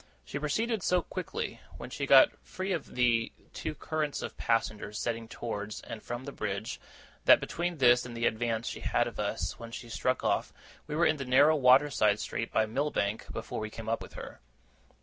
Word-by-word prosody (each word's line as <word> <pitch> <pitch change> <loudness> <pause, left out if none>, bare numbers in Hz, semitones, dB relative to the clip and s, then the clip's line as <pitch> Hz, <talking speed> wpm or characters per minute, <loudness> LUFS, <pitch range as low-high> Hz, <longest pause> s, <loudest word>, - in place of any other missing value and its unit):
She 140 - -4
proceeded 215 +9 0
so 180 0 +2
quickly, 445 - -5 0.2
when - - -8
she - - -3
got - - +8
free 190 +1 -5
of 165 -6 -3
the 120 -2 +2 0.2
two 155 - -4
currents 155 -2 -2
of - - -5
passengers 110 -2 -1
setting 115 0 -2
towards 105 -2 -5
and 110 - -8
from 120 +2 -5
the 140 - -5
bridge, 100 -3 -4 0.5
that, - - +8
between 175 0 -3
this 125 -2 +5
and 120 -1 -7
the 115 - 0
advance 115 0 0
she - - -4
had - - +1
of - - -7
us - - -2
when 115 - -8
she 120 0 -8
struck 125 +2 0
off, - - 0 0.3
we 150 - -3
were 170 +2 +3
in 155 - +3
the 135 - -3
narrow 140 +5 +5
water 135 +1 +6
side 105 -4 +3
street 115 +1 -3
by 110 - +3
Millbank 110 -3 -1
before 115 - -5
we 110 0 -4
came 110 0 -8
up 115 +1 0
with - - -10
her. - - -9
125 Hz, 200 wpm, -30 LUFS, 115-150 Hz, 0.5 s, got